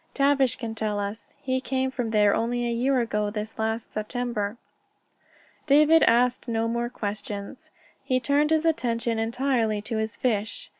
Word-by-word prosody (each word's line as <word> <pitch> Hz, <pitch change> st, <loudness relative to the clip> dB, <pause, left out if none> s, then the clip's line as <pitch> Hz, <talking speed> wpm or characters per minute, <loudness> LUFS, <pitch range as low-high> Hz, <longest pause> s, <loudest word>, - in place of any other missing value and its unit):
Tavish 275 Hz, -3 st, +3 dB
can 230 Hz, -3 st, -5 dB
tell 215 Hz, -2 st, -2 dB
us. 205 Hz, +2 st, -5 dB
He 260 Hz, 0 st, 0 dB
came 260 Hz, 0 st, -1 dB
from 245 Hz, -3 st, -3 dB
there 210 Hz, -2 st, +4 dB
only 240 Hz, +2 st, 0 dB
a -, -, -1 dB
year 255 Hz, +3 st, +2 dB
ago 210 Hz, -2 st, -1 dB
this 210 Hz, +1 st, -6 dB
last 220 Hz, +1 st, -2 dB
September." 215 Hz, -1 st, -3 dB, 1.1 s
David 305 Hz, +3 st, +6 dB
asked 245 Hz, +2 st, +3 dB
no 225 Hz, -1 st, 0 dB
more 235 Hz, +1 st, -1 dB
questions. 205 Hz, 0 st, -6 dB, 0.3 s
He 255 Hz, -2 st, +1 dB
turned 290 Hz, +3 st, +2 dB
his 320 Hz, 0 st, +2 dB
attention 235 Hz, -6 st, 0 dB
entirely 230 Hz, -2 st, 0 dB
to 225 Hz, +1 st, -3 dB
his 220 Hz, +1 st, -2 dB
fish. 240 Hz, -, -2 dB
235 Hz, 155 wpm, -26 LUFS, 220-260 Hz, 1.1 s, David